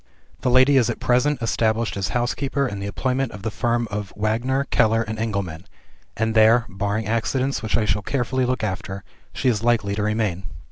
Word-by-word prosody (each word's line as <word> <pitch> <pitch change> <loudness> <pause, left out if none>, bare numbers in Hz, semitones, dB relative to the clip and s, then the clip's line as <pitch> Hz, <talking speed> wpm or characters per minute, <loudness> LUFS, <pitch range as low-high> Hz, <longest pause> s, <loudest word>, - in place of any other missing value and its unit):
"The - - 0
lady 130 +3 +5
is 125 - +3
at - - -3
present 125 +1 +1
established 115 0 0
as 100 -2 -1
housekeeper 135 +3 -1
in 100 -4 -5
the 100 - -4
employment 130 +5 -1
of 100 - -9
the 110 - -2
firm 120 +2 0
of 105 -2 -4
Wagner, 120 +6 0
Keller, 115 +1 +3
and 110 0 -5
Engelman; 100 -6 -3 0.5
and 110 0 0
there 115 +2 +5
(barring 100 +2 -2
accidents, 130 +5 0
which 110 +1 0
I 110 - +1
shall 105 -1 0
carefully 130 +3 -1
look 125 -3 -1
after) 95 -1 -4 0.3
she 130 - -2
is 110 -4 +2
likely 115 -4 +2
to 105 - -2
remain. 105 -4 -1
110 Hz, 190 wpm, -22 LUFS, 105-125 Hz, 0.5 s, lady